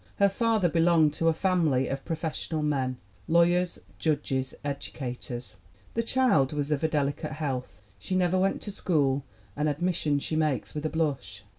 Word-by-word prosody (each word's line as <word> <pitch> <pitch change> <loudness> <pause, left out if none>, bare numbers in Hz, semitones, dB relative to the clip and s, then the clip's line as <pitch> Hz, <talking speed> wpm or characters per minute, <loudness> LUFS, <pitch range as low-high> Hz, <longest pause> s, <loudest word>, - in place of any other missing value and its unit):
Her 200 0 +4
father 220 -2 +2
belonged 165 -2 +4
to 165 - 0
a - - +6
family 160 -7 +2
of 135 0 -3
pro 165 - -2
fessional 160 0 -3
men 130 -4 0 0.3
lawyers, 175 +1 +3 0.2
judges, 140 -4 -1
educators. 125 -4 -5 0.4
The 230 - +1
child 230 - +2
was 145 0 -2
of 150 -1 +1
delicate 150 +1 -1
health. 130 - -4 0.2
She 185 - -3
never 185 0 +2
went 195 +1 +1
to 205 - -4
school 145 -8 +1 0.3
an 150 +1 0
admission 155 -1 0
she 150 +2 -2
makes 155 -6 0
with 150 +1 -2
a - - -3
blush. 145 -11 -2
155 Hz, 160 wpm, -28 LUFS, 140-175 Hz, 0.4 s, a